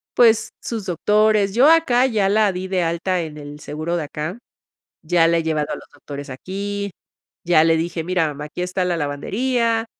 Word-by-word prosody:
pues 225 -2 +4
sus 225 -4 -4
doctores, 210 +3 +2
yo 265 +5 +6
acá 260 -7 +4
ya 215 -6 +1
la 210 -1 +3
di 185 +1 -4
de 185 -2 0
alta 170 +2 -1
en 155 -2 -7
el 145 0 -9
seguro 155 +4 -3
de 160 - -2
acá, 155 +7 -5 0.7
ya 165 0 +3
la 170 0 +3
he 165 - 0
llevado 155 -2 -1
a - - -3
los - - -13
doctores 145 -1 -9
aquí, 200 +7 -4 0.5
ya 170 -3 +5
le 165 0 +4
dije: 165 0 -2
"Mira, 180 -2 +1
mamá, 150 0 -6
aquí 150 - -8
está 180 +1 -1
la 180 -1 0
lavandería, 225 - -1
180 Hz, 190 wpm, -21 LUFS, 160-215 Hz, 0.7 s, yo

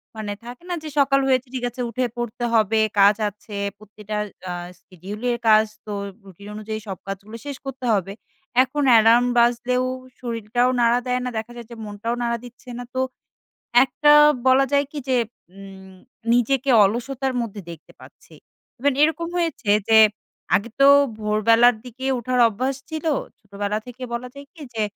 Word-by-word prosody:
মানে 210 -2 -4
থাকে 245 +7 -10
না 355 - -1
যে, 310 - -6
"সকাল 275 0 +4
হয়েছে, 255 0 +1
ঠিক 250 -1 -4
আছে, 245 +1 -7
উঠে 250 +2 -1
পড়তে 240 0 -4
হবে, 220 0 +3 0.2
কাজ 200 +1 +6
আছে। 205 0 -11 0.2
প্রতিটা 210 0 -9 0.3
আ - - -3 0.3
শিডিউলের 210 +7 -4
কাজ 215 0 +6 0.2
তো 210 - -5 0.3
রুটিন 195 +2 -13
অনুযায়ী 215 0 -5
সব 190 -3 -5
কাজগুলো 200 +3 -7
শেষ 280 -2 -5
করতে 265 -1 -6
হবে।" 195 -1 -1 0.5
এখন 285 +3 -3
অ্যালার্ম 230 +2 +6
বাজলেও 245 +1 +2 0.4
শরীরটাও 240 +1 -1
নাড়া 235 +1 +3
দেয় 250 0 0
না। 250 - -2
দেখা 225 +2 -5
যায় 235 -2 -9
যে - - -8
মনটাও 210 +3 -4
নাড়া 235 0 0
দিচ্ছে 245 +1 -13
না। 245 - -6
তো - - 0 0.9
একটা 295 +3 +3 0.3
বলা 260 +1 +5
যায় 280 0 +3
কি 300 - -5
যে, 255 - +2 0.4
ইম 190 -1 -12 0.4
নিজেকে 265 +3 +1
অলসতার 250 +5 -2
মধ্যে 215 -3 -5
দেখতে 165 -2 -12
পাচ্ছি। - - -17 0.4
ইভেন 280 +2 +1
এরকম 320 +2 +1
হয়েছে 330 -10 -2 0.2
যে 220 0 +7 0.6
আগে 205 +5 +1
তো 275 - +7 0.3
ভোরবেলার 225 +3 +4
দিকে 255 +2 -7
ওঠার 250 +1 -2
অভ্যাস 255 +5 -2
ছিল। 315 0 -5 0.3
ছোটবেলা 205 0 -4
থেকে 250 +1 -11
বলা 245 +1 -4
যায় 280 0 -11
কি 315 - -12
যে, 220 - -1
235 Hz, 165 wpm, -22 LUFS, 210-255 Hz, 0.9 s, যে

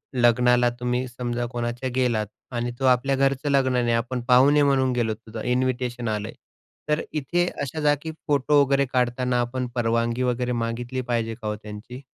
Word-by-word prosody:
लग्नाला 125 0 +4
तुम्ही 125 +1 -1
समजा 120 0 -3
कोणाच्या 120 +1 -3
गेलात 120 -5 +1 0.3
आणि 120 +1 -1
तो 135 - 0
आपल्या 130 +2 +3
घरचं 135 +1 +1
लग्न 135 -2 +3
नाही, 120 -1 +1
आपण 125 +1 -2
पाहुणे 140 +4 +6
म्हणून 135 -2 +3
गेलो. 115 -3 0
तुझं 110 0 -9
इन्व्हिटेशन 125 -1 -1
आलं 105 -1 -2
आहे. - - -10 0.5
तर 150 +1 +2
इथे 165 +4 0 0.2
अशा 145 +3 -4
जागी 150 +2 +1 0.2
फोटो 145 0 +3
वगैरे 140 0 +2
काढताना 125 0 +1
आपण 125 +1 -2
परवानगी 115 +1 0
वगैरे 125 0 0
मागितली 120 +3 -3
पाहिजे 115 -1 -1
का 110 - -4
हो 105 - -1
त्यांची? 105 +4 -9
125 Hz, 170 wpm, -24 LUFS, 120-130 Hz, 0.5 s, पाहुणे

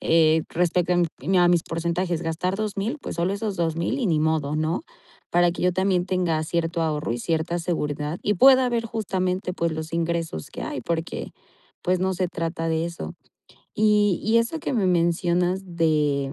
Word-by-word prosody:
eh, 160 -1 +4
respecto 180 +1 +1
a - - +2 0.3
mi 190 +1 +3
a 175 0 +5
mis 175 -2 +3
porcentajes 170 +1 -1
gastar 170 +4 -1
2.000, 215 +4 -2
pues - - -6
solo 175 +3 0
esos 200 -1 -3
2,000 170 - -1
y 240 - 0
ni 160 -4 +2
modo, 155 -2 0
¿no?, 155 - -1 0.5
para 175 0 +4
que 175 - -5
yo 180 0 +3
también 185 -1 +1
tenga 175 -4 0
cierto 165 +1 -1
ahorro 150 -4 -1
y 120 - -3
cierta 165 +5 -1
seguridad 150 -2 -2
y 210 - +1
pueda 260 +4 +6
ver 235 -1 -1
justamente 185 -4 -2
pues, 170 -2 -1
los 160 +1 -5
ingresos 165 - -2
que - - -7
hay - - -4
porque 165 0 -3 0.5
pues, 180 0 +1
no 190 0 +1
se 180 0 -1
trata 165 -1 -3
de 160 0 0
eso 80 - -6 0.6
y 210 -3 +3
y 225 +2 +4
eso 235 +8 -1
que - - -3
me 200 -5 +2
mencionas 175 +1 +1
de 150 -4 +1
170 Hz, 185 wpm, -24 LUFS, 160-185 Hz, 0.6 s, pueda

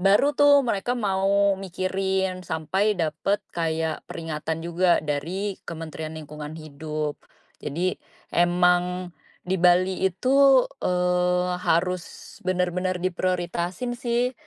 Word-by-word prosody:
baru 200 +10 +4
tuh 285 -1 +7
mereka 230 +1 -1
mau 200 -1 +2
mikirin, 190 0 -1
sampai 190 +6 0
dapat 165 +5 0
kayak 160 -1 -2
peringatan 160 0 -4
juga 175 +1 +3
dari 180 +7 -2
Kementerian 160 -1 -6
Lingkungan 150 0 -8
Hidup. 155 0 -5 0.4
Jadi 175 +6 -1 0.4
emang 180 +1 +2 0.3
di 185 +1 0
Bali 180 +1 +3
itu, 265 +7 +4 0.2
eee, 180 0 +1
harus 180 +1 +1 0.4
benar-benar 180 0 0
diprioritasin 180 +4 -2
sih, 240 +1 0
180 Hz, 100 wpm, -25 LUFS, 165-190 Hz, 0.4 s, tuh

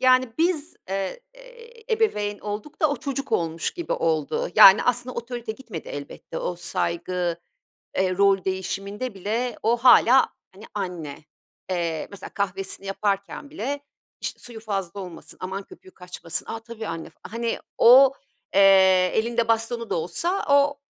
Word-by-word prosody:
Yani 255 -2 +4
biz, 330 -2 0
eee, 195 - -3
eee, 480 -2 -11
ebeveyn 210 - 0
olduk 210 +7 -6
da 310 - +4
o 290 - -1
çocuk 275 -1 -4
olmuş 165 0 0
gibi 345 -2 -4
oldu. 160 -3 0
Yani, 195 +2 +9
aslında 250 +1 0
otorite 235 -1 -5
gitmedi 220 -9 -9
elbette 145 +3 -7
o 175 - -3
saygı, 175 -1 -2 0.6
eee, 185 -1 +1
rol 195 -1 +4
değişiminde 195 +5 -3
bile 220 +5 -2
o 230 +2 +3
hâlâ, 250 +1 +6 0.3
hani, 200 - -14
anne. 175 -8 -5 0.4
Eee, 170 -3 -2
mesela 200 - -9
kahvesini 195 -1 -3
yaparken 200 +6 -2
bile, 285 -1 -3 0.4
işte, - - -4
suyu 235 -2 -9
fazla 200 -4 -4
olmasın, 180 -4 -9
aman 190 +2 -4
köpüğü 185 - -16
kaçmasın. 180 -3 -5
A! 225 - -5
Tabii 225 -1 -8
anne 165 -2 -5
f - - -30
Hani, 230 +2 -3 0.2
o, 260 +3 +8 0.4
eee, 190 -2 +6
elinde 230 +1 +1
bastonu 230 +1 0
da - - 0
olsa 340 - -1
o, 285 0 +4
205 Hz, 145 wpm, -24 LUFS, 185-255 Hz, 0.6 s, Yani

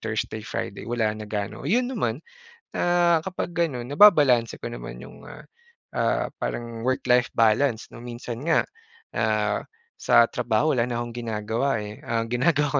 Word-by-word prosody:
Thursday, 110 0 -3
Friday, 100 - -5
wala 115 -2 0
na 110 - -7
gaano. 105 +3 -4
Yun 245 +5 +2
naman, - - -1 0.6
ah, 175 -1 +3
kapag 185 -2 -4
gano'n, 150 -8 0
nababalanse 145 - +6
ko - - -4
naman - - -8
yung, - - -13
ah, 150 - -11 0.5
ah, - - +1
parang 115 -1 -4
work-life 125 -1 +2
balance 115 +2 +2
'no. - - -10
Minsan 120 0 -6
nga, 165 -1 +4 0.6
ah, - - +1 0.4
sa 120 0 +5
trabaho, 125 +5 +1
wala 120 -2 +2
na 120 -1 -2
kong 120 -1 -5
ginagawa, 115 +3 -1
eh. 105 0 -8
Ah, 115 -1 -1
ginagawa 145 +5 +2
120 Hz, 150 wpm, -25 LUFS, 110-145 Hz, 0.6 s, nababalanse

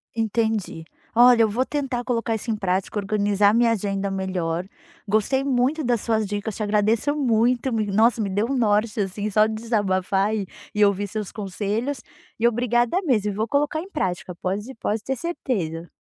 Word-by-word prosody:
Entendi. 220 -6 -1 0.3
Olha, 240 0 +7
eu 220 - +2
vou 245 +5 0
tentar 270 -5 -2
colocar 230 -2 -1
isso 220 +2 -6
em - - 0
prática, 195 0 -1
organizar 205 0 +2
minha 235 0 +4
agenda 200 -2 -1
melhor, 185 -3 -2 0.4
gostei 215 +6 +1
muito 275 +3 +1
das 240 -3 +1
suas 220 -2 0
dicas, 205 +1 -4
te 215 - -3
agradeço 215 +6 +1
muito, 245 -1 +2
me 220 -1 0
nossa, 225 +4 +3
me 200 - -1
deu 205 +3 0
um 275 - -1
norte, 215 -1 +1
assim, 205 +2 -3
só 215 +1 +4
de 220 - -2
desabafar 205 -3 0
e 205 -2 -2 0.3
e 210 - +4
ouvir 200 0 +1
seus 210 -1 -5
conselhos, 215 +6 -3 0.4
e 235 - +4
obrigada 240 - +1
mesmo, 215 - +1
vou 215 +3 -1
colocar 295 +4 0
em 370 - -10
prática, 185 - -3
pode 200 +8 -4
pode 220 -1 -2
ter 265 - -2
certeza. 185 - -3
215 Hz, 175 wpm, -23 LUFS, 200-240 Hz, 0.4 s, Olha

